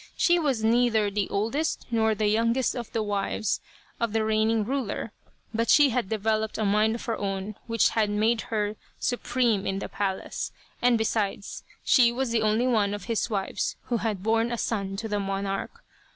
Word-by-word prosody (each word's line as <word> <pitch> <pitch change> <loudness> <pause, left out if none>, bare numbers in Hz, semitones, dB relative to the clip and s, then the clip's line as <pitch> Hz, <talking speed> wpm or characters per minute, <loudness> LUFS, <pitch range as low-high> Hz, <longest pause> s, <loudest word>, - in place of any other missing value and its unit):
She 350 0 +4
was 270 -8 0
neither 225 -2 +3
the 200 -1 -1
oldest 230 +11 -1
nor 220 -1 +2
the 215 +1 0
youngest 230 +4 +2
of 240 -3 -5
the 225 - -1
wives 205 0 -1 0.4
of 230 -2 -1
the 220 -1 +1
reigning 220 0 +2
ruler, 245 -4 -2 0.4
but 230 +1 0
she 290 -2 +7
had 235 -5 -1
developed 220 0 0
a 215 - 0
mind 215 +2 +3
of 235 - -7
her 230 - -1
own 195 0 -3
which 230 -1 +3
had 215 -2 +1
made 220 +2 +2
her 210 -1 -1 0.2
supreme 245 -4 0
in 195 0 -1
the - - -4
palace, 195 -2 -3 0.3
and 245 -1 +4
besides, 210 -2 -2 0.2
she 240 -3 +5
was 255 0 -2
the 230 -1 +2
only 215 +3 +2
one 210 -5 +2
of 205 - -8
his 230 0 -1
wives 195 -3 -2
who 240 - +2
had 210 -3 -2
borne 225 +2 +2
a 240 - -1
son 195 -4 -2
to 220 +2 -3
the 210 -1 -1
monarch. 195 - -3
220 Hz, 185 wpm, -26 LUFS, 205-235 Hz, 0.4 s, she